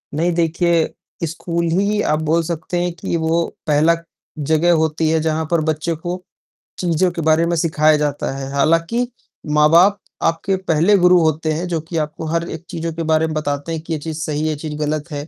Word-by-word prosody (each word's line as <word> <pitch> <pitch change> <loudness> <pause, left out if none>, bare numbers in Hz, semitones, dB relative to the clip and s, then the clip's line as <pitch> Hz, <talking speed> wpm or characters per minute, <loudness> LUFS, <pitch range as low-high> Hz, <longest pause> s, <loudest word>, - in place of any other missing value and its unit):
नहीं 170 +3 +1
देखिए, 170 0 +1 0.3
स्कूल 170 +1 -3
ही 200 +4 +1
आप 155 -4 +1
बोल 165 +1 +3
सकते 170 +2 -3
हैं 175 - -1
कि 170 - -4
वो 165 +1 +1 0.2
पहला 155 +3 +4 0.5
जगह 165 +2 +4
होती 160 0 +1
है, 160 0 +2
जहाँ 160 0 0
पर 170 -2 +3
बच्चे 160 +2 -2
को 175 +3 -5 0.6
चीज़ों 175 0 +1
के 170 - -4
बारे 160 +2 +3
में 170 0 0
सिखाया 155 -1 +3
जाता 145 -2 -1
है। 135 0 -5
हालाँकि 165 - +1 0.5
माँ-बाप 170 +6 +5 0.2
आपके 165 +4 +1
पहले 185 +2 +3
गुरु 180 0 +5
होते 155 0 +1
हैं, 175 +4 -3
जो 165 -3 -2
कि 165 +1 -5
आपको 155 +1 -3
हर 170 +1 -1
एक 165 +2 -7
चीज़ों 165 0 -4
के 165 0 -4
बारे 160 +1 +3
में 155 - -4
बताते 145 +1 -2
हैं 160 -1 -3
कि 165 0 -5
ये 155 - -2
चीज़ 160 +1 -5
सही 150 -1 -2
है, 155 - 0
यह 155 - -1
चीज़ 150 0 -5
गलत 150 +2 -2
है, 145 +1 -5
160 Hz, 205 wpm, -19 LUFS, 155-170 Hz, 0.6 s, माँ-बाप